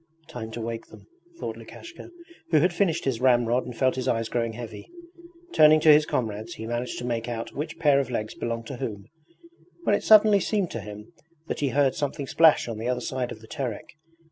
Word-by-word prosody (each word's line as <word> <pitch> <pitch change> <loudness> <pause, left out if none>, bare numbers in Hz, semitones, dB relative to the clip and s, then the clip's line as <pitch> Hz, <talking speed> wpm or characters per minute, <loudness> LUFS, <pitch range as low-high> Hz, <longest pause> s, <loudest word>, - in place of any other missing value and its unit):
'Time 120 -7 -6
to 115 - -7
wake 115 0 -5
them,' - - -15 0.3
thought - - -4
Lukashka, 340 +1 -11 0.4
who 160 - +4
had 175 +4 +3
finished 170 -3 0
his 130 -3 -1
ramrod 120 -1 +3
and 120 -2 -8
felt 130 -1 +2
his 130 0 -3
eyes 115 -2 0
growing 115 -2 -1
heavy. 115 - -9 0.6
Turning 155 0 +7
to 155 0 +7
his 150 0 +4
comrades 110 -1 -3
he 110 - -7
managed 120 +2 -3
to 120 - -5
make 120 -1 -2
out 115 -1 -5
which 155 +3 -5
pair 145 -4 +4
of 135 -3 -2
legs 110 -3 -3
belonged 115 -1 -4
to 130 - -7
whom, 100 -4 -5 0.8
when - - +2
it - - +1
suddenly 215 -1 +6
seemed 195 -1 -1
to 115 - -5
him 105 +1 -10 0.3
that - - -4
he 140 - 0
heard 135 +1 +2
something 145 -1 -3
splash 160 +1 +4
on 115 -2 -5
the 115 - -3
other 125 0 0
side 130 -2 -3
of 110 - -9
the 110 - -14
Terek. 130 -7 -5
125 Hz, 215 wpm, -26 LUFS, 115-150 Hz, 0.8 s, Turning